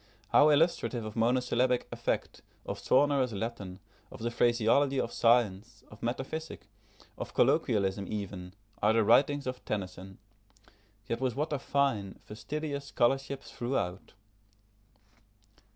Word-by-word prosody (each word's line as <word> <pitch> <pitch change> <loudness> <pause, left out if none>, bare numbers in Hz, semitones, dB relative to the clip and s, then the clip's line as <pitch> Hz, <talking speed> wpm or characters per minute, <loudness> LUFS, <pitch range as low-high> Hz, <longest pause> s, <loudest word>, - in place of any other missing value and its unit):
How 150 +1 +6
illustrative 145 -6 +2
of 110 - -7
monosyllabic 125 +1 +1
effect, - - -3 0.2
of - - -5
sonorous 135 -3 +2
Latin, 100 -3 -5 0.3
of 130 - -9
the 120 +1 -2
phraseology 120 +4 +2
of 115 - -2
science, 115 -2 +1
of 105 - -14
metaphysic, 135 +7 -4 0.5
of - - -6
colloquialism 100 -1 +2
even, 95 -3 -6 0.3
are 105 +2 +4
the 115 0 +3
writings 140 +6 +4
of 130 -1 -5
Tennyson; 95 -1 -5 0.9
yet 115 +2 -3
with 130 -3 0
what 150 +2 -2
a 145 - -1
fine, 135 -9 0
fastidious 140 +6 -5
scholarship 135 +1 0
throughout! 100 -8 -4
120 Hz, 120 wpm, -30 LUFS, 105-135 Hz, 0.9 s, How